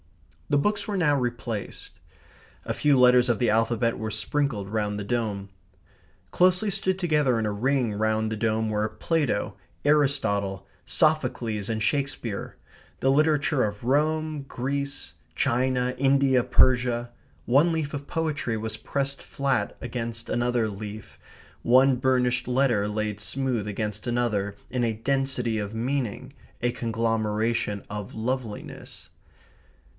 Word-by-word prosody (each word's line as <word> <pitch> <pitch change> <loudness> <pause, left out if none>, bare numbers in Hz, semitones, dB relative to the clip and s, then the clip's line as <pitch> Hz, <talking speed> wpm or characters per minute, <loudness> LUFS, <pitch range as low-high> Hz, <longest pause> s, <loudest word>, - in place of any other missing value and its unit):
The 145 - +3
books 205 +6 0
were 205 -2 -1
now 150 -5 +3
replaced. 120 -4 -4 0.7
A - - -1
few 145 -3 +3
letters 125 0 +6
of 120 - +2
the 120 -3 +2
alphabet 115 +1 +1
were 110 -1 -3
sprinkled 110 -2 -1
round 105 -1 -1
the 105 - -4
dome. 100 -3 -2 0.8
Closely 185 +3 +3
stood 190 0 0
together 150 -8 +2
in 110 - 0
a 105 - 0
ring 125 +1 +1
round 110 +1 0
the - - -1
dome 110 0 0
were 105 0 0
Plato, 150 -10 -1 0.3
Aristotle, 100 -10 +1 0.2
Sophocles, 125 - +1
and 110 -1 -1
Shakespeare; 125 -4 -2 0.4
the 135 - +3
literature 150 -1 +3
of 105 +1 -3
Rome, 155 +3 +1
Greece, 140 +3 -3 0.2
China, 125 +1 +1
India, 135 -2 +4
Persia. 120 -1 +3 0.3
One 145 +8 +4
leaf 160 -3 -2
of 140 -1 -5
poetry 150 -8 -1
was 110 0 -4
pressed 140 +4 -2
flat 135 -7 -1
against 115 -1 -4
another 120 -1 +1
leaf, 105 +1 -8 0.4
one 130 +2 +5
burnished 125 -1 +1
letter 125 -5 +2
laid 105 0 -2
smooth 125 -3 -1
against 105 +1 -4
another 110 -5 0
in 125 -1 -1
a 115 -1 +1
density 125 -1 0
of 105 +1 -4
meaning, 125 -1 -2 0.3
a 120 +1 +1
conglomeration 115 -2 -1
of 105 -1 -6
loveliness. 115 -1 -5
120 Hz, 130 wpm, -26 LUFS, 110-140 Hz, 0.8 s, letters